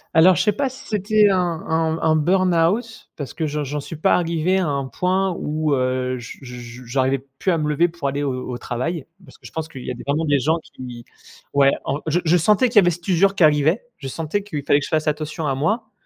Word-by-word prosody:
Alors 175 +3 +7
je - - +1
sais 210 - +3
pas 270 +5 -1
si 260 - -13
c'était 210 0 +3
un 190 - +2
un 160 -2 -1
un 160 -1 +3
burn-out 185 +6 +1
parce 145 -3 -7
que 160 - -1
j'en 150 0 -2
j'en 145 +2 -3
suis 160 - -7
pas 155 - +3
arrivé 170 +2 +1
à 185 - +1
un 140 -2 -1
point 185 +3 0
où, 150 -1 0
heu, 130 0 -1
je 120 - -9
je 125 -1 -9
j'arrivais 130 +2 +1 0.2
plus 185 - 0
à 165 - +1
me 150 0 -1
lever 165 +4 +3
pour 165 -4 -4
aller 140 +1 -2
au 135 -2 -1 0.2
au 120 - -3
travail, 130 +6 -3 0.2
parce - - -16
que - - -20
je - - -10
pense 160 -1 -4
qu'il 135 -7 -10
y - - -3
a - - -2
vraiment 155 +3 +1
des 145 -2 +3
gens 160 +5 +1
qui 120 -2 -10 0.5
ouais, 140 -1 +5 0.2
en 140 +2 -1
je 165 +3 +2
je 175 +3 +4
sentais 210 +8 +3
qu'il 230 - -1
y - - +12
avait 175 -2 +4
cette 175 +2 -6
usure 195 +2 +3
qui 175 - +3
arrivait, 155 +8 +3
je 135 -6 -7
sentais 165 +8 -2
qu'il 155 -9 -5
fallait 145 +1 +3
que 145 - -4
je - - -8
fasse 155 0 0
attention 155 +1 -2
à 135 - +1
moi 215 - -1
160 Hz, 250 wpm, -21 LUFS, 140-180 Hz, 0.5 s, y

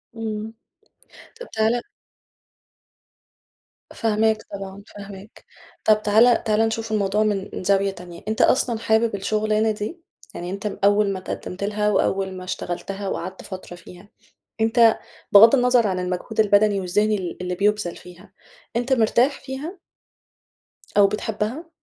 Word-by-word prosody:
امم، 220 -1 -5 0.9
طب 485 - -8
تعال 220 +2 +1 2.1
فاهماك 220 -1 +1
طبعًا 195 0 -7
فاهماك، 200 +1 -11 0.4
طب 215 -1 +4
تعالَ 225 +3 +4
تعالَ 215 -2 +1
نشوف 225 0 -4
الموضوع 210 0 +1
من 205 -3 -1
من - - -5
زاوية 195 +1 +2
تانية، 175 -2 -11
أنت 220 0 0
أصلًا 240 -3 +2
حابب 220 -1 +1
الشغلانة 215 +2 0
دي؟ 215 +11 -5 0.3
يعني 175 - -5
أنت 200 +2 -6 0.2
أوّل 205 0 +3
ما 190 - -4
اتقدمت 185 +1 -6
لها 210 +1 0
وأوّل 190 -2 0
ما 185 - -8
اشتغلتها 195 +2 -5
وقعدت 185 0 -5
فترة 185 -2 -8
فيها، 180 +3 -14 0.5
أنت 225 0 +4 0.3
بغض 225 +6 +8
النَّظر 245 -3 +3
عن 185 -1 -1
المجهود 180 +4 -4
البدني 205 -1 +4
والذِّهني 210 +4 +1
ال 180 -2 -6
اللي 180 0 -3
بيبذل 205 -2 0
فيها، 180 +2 -15 0.4
أنت 245 +3 +1
مرتاح 245 +3 +2
فيها؟ 290 +8 -7 1.2
أو 200 -1 +7
بتحبها؟ 220 - -3
210 Hz, 130 wpm, -22 LUFS, 195-220 Hz, 2.1 s, بغض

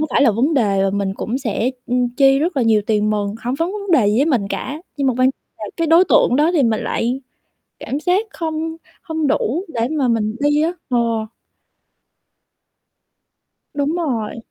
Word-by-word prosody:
có 310 - +1
phải - - +3
là 265 - +5
vấn 255 +9 +1
đề 200 -7 +2
và 195 - +1
mình 195 -1 -2
cũng 235 +6 -3
sẽ, 240 -1 -1 0.2
ưm, 250 0 +1
chi 270 -1 +5
rất 320 +1 -1
là 260 - +2
nhiều 220 -2 +3
tiền 215 -1 +1
mừng, 205 -1 -1
hổng 245 +2 -1
vấn 330 +6 -2
vấn 405 -2 -5
đề 245 -10 +4
gì 210 - +1
với 275 +5 +3
mình 240 -11 +1
cả, 275 +8 -4 0.2
nhưng 280 -2 0
mà 255 - +2
quan 255 +1 +4 0.3
là - - -6
cái 330 - 0
đối 330 +3 +6
tượng 245 - +4
đó 300 +4 +3
thì 320 -5 +3
mình 225 -3 +1
lại 245 +3 -1 0.6
cảm 280 - -4
giác 365 +7 +1
không 320 0 -3 0.3
hông 320 -2 -2
đủ 305 - 0
để 230 0 0
mà 290 -5 +1
mình 220 -2 0
đi 290 +1 +2
á. 325 +2 +1 0.2
Ờ. 245 - +1 2.8
Đúng 285 +2 -1
rồi. 250 -11 -2
265 Hz, 200 wpm, -19 LUFS, 225-315 Hz, 2.8 s, đối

